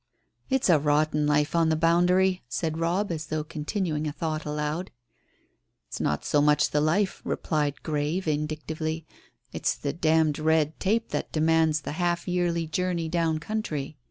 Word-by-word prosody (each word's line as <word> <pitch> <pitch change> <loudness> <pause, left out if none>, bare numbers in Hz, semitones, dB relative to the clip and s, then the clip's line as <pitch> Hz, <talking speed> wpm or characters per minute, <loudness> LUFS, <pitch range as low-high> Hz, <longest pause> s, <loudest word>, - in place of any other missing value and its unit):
"It's 265 -1 +2
a 170 -5 +5
rotten 150 +1 +2
life 150 +2 +2
on 165 -1 +3
the 160 - +2
boundary," 180 +3 +3
said 160 +6 -2
Robb, 180 +4 0
as 160 -2 -4
though 155 0 -2
continuing 155 0 -2
a - - -2
thought 155 0 -3
aloud. 150 +4 -2 1.0
"It's - - -6
not 75 - -1
so 145 - +3
much 150 0 +3
the 150 - +2
life," 190 +6 +1
replied 150 -3 -1
Grey 150 +3 -1
vindictively, 155 0 -3 0.5
"it's - - 0
the 140 -1 -3
d 160 0 +3
d 150 - -6
red 160 -1 +2
tape 220 +4 0
that - - -3
demands 160 -1 +2
the - - -5
half 175 -1 0
yearly 175 -2 0
journey 170 0 -1
down 165 -2 +1
country. 155 -6 -4
160 Hz, 160 wpm, -26 LUFS, 150-170 Hz, 1.0 s, a